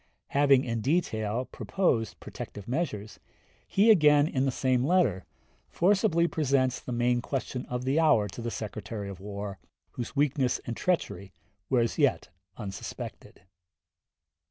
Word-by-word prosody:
Having 140 -2 +4
in 115 -2 -2
detail 120 -5 0
proposed 120 - -1
protective 105 -1 -8
measures, 115 - -3 0.5
he 215 +3 +5
again, 150 -6 +5
in 135 -3 0
the 135 - +1
same 130 -1 +1
letter, 140 - +2 0.4
forcibly 180 -2 +3
presents 135 -5 +1
the - - -8
main 120 0 +1
question 130 -1 -4
of 125 0 -4
the 135 +4 +2
hour 150 -10 +4
to 105 - -8
the 115 - -3
Secretary 105 -2 -5
of 95 -2 -8
War, 100 0 -6 0.3
whose 120 +2 -6
weakness 140 -3 +2
and 120 - -4
treachery 100 - -2 0.4
were 125 -2 +3
as 115 - -1
yet - - +2 0.3
unsuspected. 95 -4 -8
125 Hz, 135 wpm, -28 LUFS, 110-150 Hz, 0.5 s, he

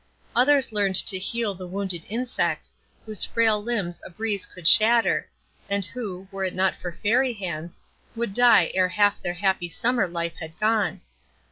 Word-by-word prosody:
Others 265 +1 +4
learned 200 -3 +1
to 190 0 +5
heal 225 +1 -2
the 185 -1 -9
wounded 185 -2 -4
insects, 240 +3 -2 0.3
whose 215 -3 +1
frail 220 -2 +2
limbs 205 -6 -3
a - - -9
breeze 205 +2 -3
could 180 -3 -3
shatter, 230 +4 +4 0.4
and 200 -1 0
who, 195 -5 -7
were 195 0 -4
it 185 - -3
not 190 +1 +1
for 175 -1 -8
Fairy 250 +4 +2
hands, 170 -5 -6 0.4
would 230 -3 -3
die 235 -6 +5
ere 185 -1 +2
half 205 +1 +2
their 175 - -3
happy 190 -2 0
summer 240 +2 0
life 170 -1 -4
had 160 +1 -10
gone. 215 -1 +1
200 Hz, 165 wpm, -24 LUFS, 180-225 Hz, 0.4 s, to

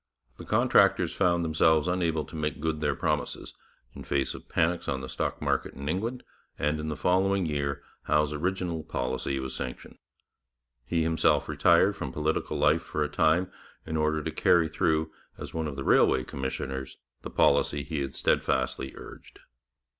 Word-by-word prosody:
The - - -9
contractors - - +3
found 85 -1 +2
themselves 80 0 +3
unable 85 -4 0
to - - -12
make 75 -2 -2
good 80 0 -2
their 75 -2 +1
promises, - - -2 0.4
in - - -9
face 70 -1 -1
of - - -12
panics 85 +1 0
on 65 -1 -2
the 65 - -6
stock 65 0 -3
market - - -1
in 70 - -7
England, 115 +10 -2 0.3
and 75 +1 0
in 75 - -4
the 75 - -2
following 95 +4 +2
year 70 -2 -2 0.2
Howe's 75 0 +2
original 90 +1 -2
policy 65 -1 -2
was 65 -1 -5
sanctioned. 65 - -7 0.9
He 80 +3 0
himself 80 0 +2
retired - - +4
from - - -5
political 75 +1 -1
life - - +3
for 75 - -2
a 75 - -2
time 85 +5 +2 0.3
in 80 - -4
order 75 0 +1
to - - -3
carry 85 -2 +3
through, 80 0 0 0.3
as - - -8
one 80 -1 -2
of 70 - -5
the 70 - -4
railway 65 -1 +4
commissioners, 65 0 -5 0.2
the - - -7
policy 75 -1 +2
he 75 -2 -3
had 70 0 -4
steadfastly 65 +1 0
urged. - - -12
75 Hz, 170 wpm, -28 LUFS, 70-80 Hz, 0.9 s, retired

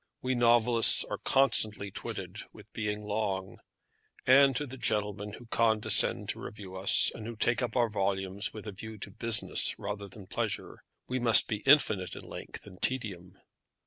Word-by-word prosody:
We 130 0 0
novelists 120 -1 +4
are - - -5
constantly 110 -7 +1
twitted - - -7
with - - -17
being 105 -1 -3
long; 100 -3 -3 0.7
and 135 +1 +6
to 145 - -2
the 130 -1 -9
gentlemen 105 -3 -2
who 120 - -11
condescend 110 -1 +3
to - - -3
review 95 -3 -9
us, 95 +1 +3
and 110 - -8
who 115 - -6
take 120 +4 0
up 120 -1 -3
our 120 -2 +3
volumes 100 -1 -2
with 110 -1 -10
a 105 - -5
view 110 +3 -9
to 105 - -9
business 115 -2 +2
rather 100 0 -6
than 100 0 -13
pleasure, - - -4 0.3
we 130 0 -2
must 115 -3 +6
be 105 - -2
infinite 110 - +4
in - - -9
length - - -9
and 90 - -14
tedium. 95 -8 -3
110 Hz, 170 wpm, -29 LUFS, 100-120 Hz, 0.7 s, and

